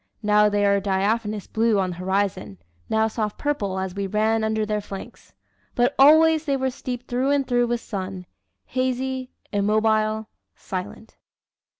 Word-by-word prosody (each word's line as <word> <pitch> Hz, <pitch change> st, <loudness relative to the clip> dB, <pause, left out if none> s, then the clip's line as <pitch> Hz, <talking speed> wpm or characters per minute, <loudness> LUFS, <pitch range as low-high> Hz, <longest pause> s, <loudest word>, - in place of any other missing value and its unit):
Now 210 Hz, 0 st, +4 dB
they 205 Hz, 0 st, +1 dB
were 200 Hz, 0 st, +3 dB
diaphanous 205 Hz, +2 st, -1 dB
blue 225 Hz, -1 st, +1 dB
on 185 Hz, -2 st, 0 dB
the -, -, -6 dB
horizon, 185 Hz, -, -2 dB, 0.3 s
now 220 Hz, 0 st, +2 dB
soft 215 Hz, -1 st, -3 dB
purple 205 Hz, -11 st, -2 dB
as 190 Hz, -1 st, -3 dB
we 200 Hz, 0 st, -3 dB
ran 220 Hz, +2 st, +1 dB
under 220 Hz, 0 st, 0 dB
their 210 Hz, 0 st, -1 dB
flanks. 195 Hz, -1 st, -10 dB, 0.4 s
But 245 Hz, +3 st, +2 dB
always 315 Hz, +2 st, +6 dB
they 280 Hz, -2 st, +1 dB
were 265 Hz, 0 st, -1 dB
steeped 250 Hz, -1 st, -6 dB
through 255 Hz, +2 st, 0 dB
and 280 Hz, -2 st, +1 dB
through 245 Hz, -1 st, +2 dB
with 240 Hz, 0 st, -1 dB
sun 190 Hz, -2 st, -5 dB, 0.4 s
hazy, 260 Hz, 0 st, -2 dB, 0.2 s
immobile, 215 Hz, +1 st, +1 dB, 0.3 s
silent." 190 Hz, +4 st, -7 dB
215 Hz, 155 wpm, -23 LUFS, 200-250 Hz, 0.4 s, always